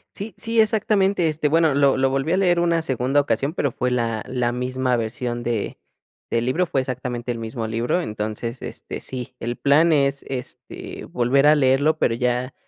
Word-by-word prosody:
Sí 205 +2 -7
sí, 230 0 +1
exactamente, 200 -4 +2
este, 155 0 -1
bueno, 160 0 +3
lo 140 -1 +4
lo 135 0 +2
volví 135 +4 0
a - - +3
leer 180 -2 +3
una 170 -1 +2
segunda 135 -1 +1
ocasión, 140 +3 -1
pero, 140 - 0
fue 125 +1 -2
la 115 -3 -1
la 125 -2 -1
misma 125 +1 -1
versión 120 +1 -3
de 115 -3 -2 0.5
del 115 +1 +1
libro, 165 +8 +1
fue 140 - 0
exactamente 125 -2 -4
el 120 - -2
mismo 115 0 -4
libro. 115 +9 0
Entonces, 110 -2 -4
este, - - -7
sí, 130 0 -7
el 120 +1 -4
plan 155 +4 +4
es, 140 -2 +1
este, 130 -2 -7
volver 130 +4 +2
a 150 - +7
leerlo, 145 +2 +3
pero 115 - +2
ya 125 +1 -1
130 Hz, 185 wpm, -22 LUFS, 120-155 Hz, 0.5 s, a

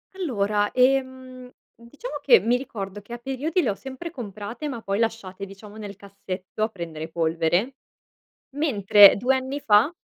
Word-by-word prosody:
Allora, 210 - 0
ehm, 255 -1 0 0.2
diciamo 290 - -9
che 475 - +6
mi 245 +2 +1
ricordo 205 -6 -7
che 205 +4 -11
a - - -4
periodi 270 +8 -1
le 245 - 0
ho - - -5
sempre 265 +8 -8
comprate 220 - -7
ma 240 -6 -5
poi 200 +1 -2
lasciate, 200 -4 -2
diciamo, 200 +2 -13
nel 205 -2 -8
cassetto 195 0 -6
a 220 - +1
prendere 165 -5 -7
polvere. 165 +8 0 0.8
Mentre, 205 -9 +6
2 255 +5 +1
anni 265 +2 -3
fa, 210 +7 +4
225 Hz, 155 wpm, -24 LUFS, 200-260 Hz, 0.8 s, che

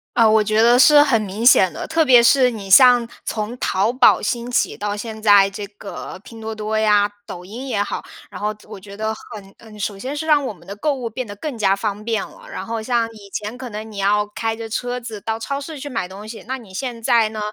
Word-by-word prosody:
呃， 230 -2 +5
我 215 0 +4
觉 215 +1 +2
得 240 +1 +5
是 295 +2 +7
很 250 -7 +2
明 210 +3 -4
显 190 -7 +6
的， - - -6
特 320 0 +2
别 250 -5 +6
是 255 0 +5
你 205 -5 -7
像 245 +2 +7 0.2
从 220 +2 -4
淘 205 +5 0
宝 255 - +5
兴 240 -1 -3
起 245 - 0
到 205 0 -3
现 220 0 -7
在 205 -2 +6
这 200 +1 -7
个 200 -2 -9
拼 225 -1 -12
多 220 0 -5
多 215 0 -3
呀、 210 -1 +3 0.2
抖 180 0 -8
音 235 +8 -8
也 205 -6 0
好， - - -5 0.3
然 - - -9
后 210 - 0 0.2
我 - - -9
觉 200 +1 -12
得 220 +1 -2
很 205 -3 -12
嗯， 215 -2 -14
首 205 0 -3
先 270 +7 -5
是 315 - -4
让 300 -2 +3
我 260 - -3
们 - - -20
的 200 - -7
购 285 +7 -1
物 250 -3 -5
变 235 +2 -5
得 205 - -8
更 290 +5 -5
加 195 -3 +2
方 205 0 -4
便 225 0 -1
了。 - - -16
然 - - -6
后 225 -1 -4
像 235 0 0
以 205 -2 -14
前 210 +3 -5
可 255 -1 -8
能 215 +1 -7
你 205 - -10
要 205 +1 +2
开 225 0 -2
着 225 0 -7
车 245 +3 -3
子 225 -4 -8
到 225 0 -3
超 275 +5 -4
市 300 +1 -8
去 290 - -7
买 230 -9 -3
东 195 +3 -10
西。 220 +1 -9
那 260 +1 -3
你 215 -7 -14
现 245 +2 -4
在 225 -1 +3
呢， 215 0 -7
220 Hz, 275 characters per minute, -20 LUFS, 205-245 Hz, 0.3 s, 是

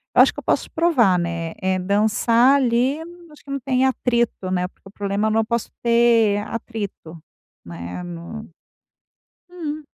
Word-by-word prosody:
eu - - +8
acho - - +5
que - - -7
eu - - -11
posso - - 0
provar, 250 - +3
né. 170 -1 -3
É 185 0 0
dançar 220 +6 +3
ali, 255 +2 +2 0.3
acho 300 - -17
que 280 - -10
não 275 - -2
tem 260 +1 +1
atrito, 235 -7 0
né, 180 0 -1
porque 195 - -20
o - - -13
problema 200 +1 -1
é 220 - +1
não 225 0 +2
posso 235 +1 -2
ter 235 -3 +4
atrito, 205 -8 -6 0.4
né, 85 - -7
no 175 +6 -8 1.0
uhum. 310 -4 -6
220 Hz, 160 wpm, -21 LUFS, 185-250 Hz, 1.0 s, eu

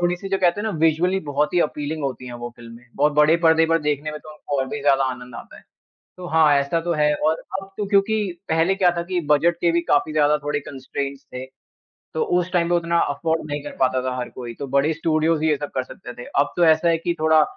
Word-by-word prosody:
थोड़ी-सी 175 +2 -1
जो 195 - 0
कहते 180 +1 +2
हैं - - -4
ना - - 0
विजुअली 165 +4 +2
बहुत 145 +1 0
ही 175 - +4
अपीलिंग 150 0 -2
होती 130 -2 -4
है 120 - -7
वो 120 0 -6
फिल्में, 115 +1 -13
बहुत 145 +2 +2
बड़े 150 +2 +5
पर्दे 160 0 +5
पर 165 0 +2
देखने 150 0 -1
में 150 - -6
तो - - -15
उनको 145 -2 -4
और 135 - 0
भी 145 - -5
ज़्यादा 135 -1 +3
आनंद 125 -1 -5
आता - - -10
है। - - -15 0.6
तो 180 -1 -7
हाँ, 160 -3 +4
ऐसा 140 +4 0
तो 170 +1 -1
है 150 -1 +2
और 155 +2 0 0.2
अब 195 0 -13
तो 210 - -2
क्योंकि 210 +2 +2 0.3
पहले 165 +4 +2
क्या 185 -3 +3
था - - 0
कि 180 0 -2
बजट 165 +3 +3
के 170 - +3
भी 170 0 +1
काफ़ी 145 +1 +2
ज़्यादा 150 0 +3
थोड़े 145 0 -1
कंस्ट्रेंट्स 140 +1 -6
थे। 125 +1 -5 0.7
तो 160 - 0
उस 180 0 +1
टाइम 170 -2 +2
पे 175 - +1
उतना 170 0 +1
अफोर्ड 160 +3 -1
नहीं 145 0 -3
कर 145 - -7
पाता 130 0 +2
था 130 0 -2
हर 125 -1 -4
कोई, 120 -2 -8
तो 140 - -6
बड़े 140 +4 +2
स्टूडियोज 160 0 0
ही 160 - +2
ये 150 - +2
सब 145 +1 -6
कर 130 - 0
सकते 125 - -10
थे। - - -8
अब 145 +1 +2
तो 175 - +4
ऐसा 160 +1 +4
है 165 - +3
कि 170 +1 -2
थोड़ा 155 0 +5
155 Hz, 255 wpm, -22 LUFS, 140-170 Hz, 0.7 s, बड़े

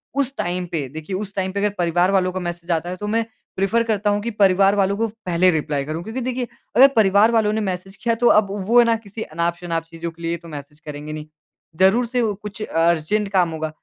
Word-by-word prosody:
उस 275 -1 0
टाइम 180 +1 -2
पे 150 -5 -2
देखिए, 160 +6 -6
उस 200 +1 -5
टाइम 190 -1 -1
पे 200 - -3
अगर 210 +1 +2
परिवार 175 +1 +2
वालों 185 -2 +2
को 185 - -4
मैसेज़ 175 0 -5
आता 165 +1 0
है 180 - -4
तो 210 +3 -6
मैं, 225 +2 +1 0.3
प्रेफ़ेर 200 +5 +1
करता 215 -2 0
हूँ 205 0 +1
कि 235 +3 -3
परिवार 195 -1 +4
वालों 200 0 +2
को 225 +1 +1 0.2
पहले 180 +1 +3
रिप्लाई 150 -3 -1
करूँ। 155 +3 -4
क्योंकि 225 +6 -5
देखिए, 250 0 -2 0.3
अगर 260 +4 +9
परिवार 210 +1 +5
वालों 220 -2 +2
ने 220 - 0
मैसेज़ 190 0 -4
किया 235 - +2
है - - -1
तो 240 - +4
अब 210 - -2 0.2
वो 240 +2 +6
है 240 - +6
ना 230 -1 +3
किसी 220 -1 -9
अनाप-शनाप 170 0 -2
चीज़ों 165 0 -5
के 165 +1 -18
लिए 170 0 -2
तो 170 0 -14
मैसेज़ 150 -1 -10
करेंगे 150 0 -7
नहीं। 155 0 -6 0.5
ज़रूर 195 +6 +4
से 245 +1 -1
वो 220 -3 +1
कुछ 210 +1 -7
अर्जेंट 170 +4 +1
काम 180 -3 +3
होगा, 160 0 -3
190 Hz, 245 wpm, -21 LUFS, 170-215 Hz, 0.5 s, अगर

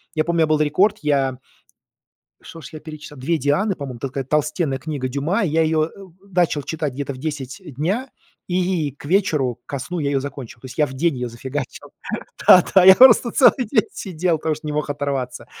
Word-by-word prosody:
Я 155 - +2
помню, 170 -1 +1
Был 155 0 +2
рекорд, 185 +8 +2
я 135 -3 +1 1.0
что 165 - -11
ж - - -11
я 155 - -8
перечитал? 155 -2 -10
"Две 160 +6 0
Дианы", 170 +9 +1
по-моему. 130 -4 -7
Такая 135 0 -4
толстенная 150 0 0
книга 140 -2 -4
Дюма, 150 - -1
и 175 - 0
я 160 +2 +2
её, 155 0 +2
э, - - -12
э, 200 - -12 0.3
начал 175 -5 +1
читать 150 -3 -3
где-то 140 +1 -4
в 130 - -10
10:00 145 +1 -5 0.2
дня, 200 - -2 0.4
и 180 -4 0
к 145 - -17
вечеру, 150 - +1
ко 140 - -4
сну 175 +7 -5
я 140 -2 -1
ее 140 -1 +1
закончил. 135 -4 -8
То 130 - -10
есть, 130 - -11
я 150 - +4
в 130 - -9
день 160 +4 0
ее 125 0 -3
зафигачил. 130 +3 -6 0.6
Да, 180 - +8
да, 190 - +7
я 190 0 +10
просто 255 -2 +7
целый 255 -1 +4
день 220 -7 +2
сидел, 175 -2 -2
потому 155 0 -1
что 155 - -11
не 150 - -3
мог 150 0 -2
оторваться, 135 -4 -3
150 Hz, 210 wpm, -21 LUFS, 135-170 Hz, 1.0 s, я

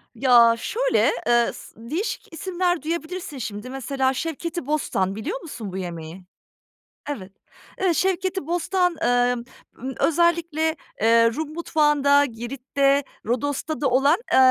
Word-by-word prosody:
Ya, 235 -2 +6
şöyle, - - +1 0.2
eee, 240 0 +4
sı - - -12 0.2
değişik 385 +1 -3
isimler 355 -1 -1
duyabilirsin 330 -1 -4
şimdi 220 0 -6
mesela 265 0 -1
şevketi 330 +1 -4
bostan, 195 -10 0
biliyor 355 - -4
musun 225 - -7
bu 190 - -5
yemeği? 170 0 -6 0.9
Evet. 195 -9 -5 0.5
Eee, 365 -3 +3
şevketi 375 -2 0
bostan, 355 +1 +1
emm, 245 0 +2 0.3
ımm, 260 +2 -6
özellikle, 330 -1 +2 0.3
eee, 230 +1 +5
Rum 310 0 -4
mutfağında, 295 -3 +3
Girit'te, 275 +3 0 0.2
Rodos'ta 285 +6 -2
da 280 - +2
olan, 280 +6 +4 0.2
eee, - - +6
285 Hz, 125 wpm, -23 LUFS, 240-335 Hz, 0.9 s, Ya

